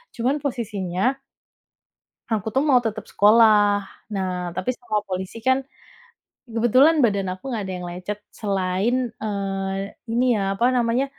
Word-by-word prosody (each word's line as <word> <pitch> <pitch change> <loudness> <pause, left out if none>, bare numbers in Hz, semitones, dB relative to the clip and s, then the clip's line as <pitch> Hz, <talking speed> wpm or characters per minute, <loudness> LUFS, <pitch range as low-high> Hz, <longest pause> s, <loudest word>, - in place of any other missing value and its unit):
Cuman 260 +5 0
posisinya 220 -2 -1 1.1
aku 220 -1 -1
tuh 270 - +3
mau 275 -5 +5
tetap 220 -2 -3
sekolah. 210 -1 +5 0.3
Nah 180 -2 -3
tapi 185 +7 -1
sama 215 -4 -2
polisi 190 +4 -5
kan 260 +1 +3 0.9
kebetulan 255 +7 +4
badan 200 -3 0
aku 190 +9 -8
nggak 220 -5 -2
ada 190 - -4
yang 180 - -6
lecet 185 +4 -5
selain, 195 +2 0 0.3
eee, 195 -1 -3 0.2
ini 240 +2 +1
ya 195 0 0
apa 235 +5 +1
namanya, 240 +2 +2
210 Hz, 135 wpm, -23 LUFS, 195-240 Hz, 1.1 s, mau